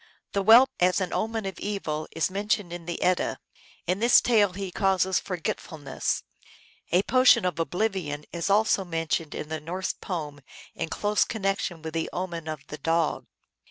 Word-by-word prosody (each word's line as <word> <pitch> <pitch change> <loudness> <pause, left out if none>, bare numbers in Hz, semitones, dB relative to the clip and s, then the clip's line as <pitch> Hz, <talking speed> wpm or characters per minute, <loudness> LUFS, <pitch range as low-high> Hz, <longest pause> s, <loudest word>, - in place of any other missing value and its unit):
The 200 - 0
whelp, 230 +6 +7
as 180 +1 +3
an 185 -2 -2
omen 225 -1 -1
of 195 - -5
evil, 160 -7 -3
is 165 +3 0
mentioned 200 -2 -1
in 175 -1 -8
the 175 - -3
Edda. 180 -1 +1 0.5
In 180 +3 0
this 235 +2 +7
tale 210 -6 +3
he 195 -1 -5
causes 190 -1 +2
forgetfulness. 160 -5 -3 0.7
A 180 +3 +4
potion 255 -6 +5
of 180 -2 -1
oblivion 175 -5 -2
is 170 +2 -2
also 205 -1 +3
mentioned 165 -3 -2
in 150 - -5
the 160 0 -3
Norse 180 +5 -3
poem 150 -6 -5 0.3
in - - -4
close 210 +3 +1
connection 195 -6 -2
with 160 -1 -5
the 165 0 -1
omen 170 -3 -4
of 155 -3 -5
the 150 +1 -8
dog. 165 +1 0
180 Hz, 165 wpm, -26 LUFS, 165-200 Hz, 0.7 s, whelp